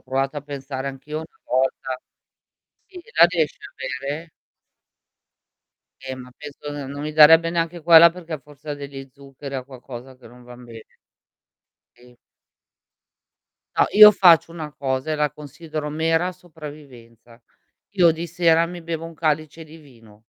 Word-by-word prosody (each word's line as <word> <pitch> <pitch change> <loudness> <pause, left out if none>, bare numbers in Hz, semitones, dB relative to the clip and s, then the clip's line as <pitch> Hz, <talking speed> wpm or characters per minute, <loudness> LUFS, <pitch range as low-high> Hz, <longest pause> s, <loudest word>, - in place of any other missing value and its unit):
provato 135 +2 -2
a - - -8
pensare 140 -1 -7
anch' 135 +1 -10
io 150 - -4
una 160 0 -12
volta? 130 0 -1 0.9
Sì, 370 -2 -12 0.2
la 170 - +9
riesci 170 -4 -2
a 135 - -11 0.3
bere? 160 +4 -5 1.8
Eh, 130 - -3
ma 125 -1 -11
penso 145 0 -9 0.2
non 140 +1 -7
mi 155 0 -4
darebbe 165 +2 +7
neanche 170 0 -2
quella 170 +1 +8
perché 170 -3 -8
forse 145 +2 -9
degli 140 -1 -9
zuccheri, 140 0 -11
ha 130 - -3
qualcosa 130 -1 -11
che 125 - -17
non 125 +2 -16
van 125 0 -13
bene. 115 -2 -12 1.1
Sì. 125 0 -20 1.6
No, - - +5
io 210 0 +10
faccio 170 -5 +5
una 155 -3 -7
cosa 135 +1 -3
e - - 0
la 150 -1 0
considero 150 +2 -7
mera 165 +3 0
sopravvivenza. 145 -9 -14 0.5
Io 175 -4 +5
di 165 +1 -4
sera 170 -1 +2
mi 175 0 -9
bevo 165 0 -5
1 165 - -11
calice 155 0 -2
di 160 +1 -14
vino. 115 -8 -19
150 Hz, 150 wpm, -22 LUFS, 130-165 Hz, 1.8 s, io